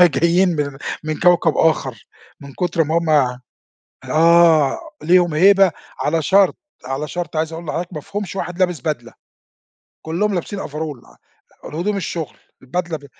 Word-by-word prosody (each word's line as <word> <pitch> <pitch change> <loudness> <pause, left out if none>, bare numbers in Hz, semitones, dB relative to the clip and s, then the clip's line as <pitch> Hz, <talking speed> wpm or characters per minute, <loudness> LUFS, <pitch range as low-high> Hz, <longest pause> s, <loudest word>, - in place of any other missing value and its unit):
جايين 170 +3 +4
من 145 -2 -3 0.3
من 155 -1 -3
كوكب 175 -3 +4
آخر 135 -8 0 0.3
من 140 -1 -11
كُتر 170 -2 0
ما 160 +3 +1
هُم 170 -1 -2 1.0
آه، 165 -2 +5 0.2
ليهم 175 0 +3
هيبة 195 +2 +5 0.3
على 160 +2 0
شرط 195 +3 +3 0.3
على 135 +3 -3
شرط 175 -1 -5
عايز 160 +1 -1
اقول 165 +1 -7
لحضرتك 175 +4 -4
ما 150 - -5
فيهُمش 200 +4 -6
واحد 180 -2 -4
لابس 180 -5 +1
بدلة 125 -5 -4 0.9
كلّهم 190 +6 -1
لابسين 195 +3 -4
overall 150 -3 -7 0.5
الهدوم 180 +8 -2
الشغل 165 -6 -5 0.2
البدلة 170 +5 -3
ب 145 - -16
165 Hz, 140 wpm, -19 LUFS, 150-180 Hz, 1.0 s, آه